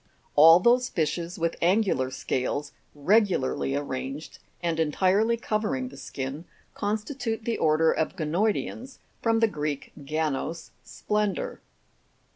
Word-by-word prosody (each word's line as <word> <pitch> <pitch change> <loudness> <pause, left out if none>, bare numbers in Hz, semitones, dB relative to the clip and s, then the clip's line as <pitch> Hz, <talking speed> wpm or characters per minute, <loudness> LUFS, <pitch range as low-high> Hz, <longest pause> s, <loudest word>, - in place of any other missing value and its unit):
All 165 +3 +9
those 245 +5 +3
fishes 170 +2 -2
with 165 0 -1
angular 180 -8 +2
scales 130 +2 -2 0.2
regularly 170 -5 +2
arranged 140 +1 -5 0.2
and 165 -1 0
entirely 190 +9 +2
covering 210 - -2
the 140 - -13
skin, 135 +3 -6 0.3
constitute 225 +2 -3
the 235 - -1
order 160 +1 +3
of 160 - -1
Ganoidcans 205 - -1 0.2
(from 225 -1 +2
the 225 - +5
Greek, 150 -7 -4
ganos, 155 +2 -2
splen 210 -2 -1
dour). - - -5
170 Hz, 115 wpm, -26 LUFS, 150-215 Hz, 0.3 s, All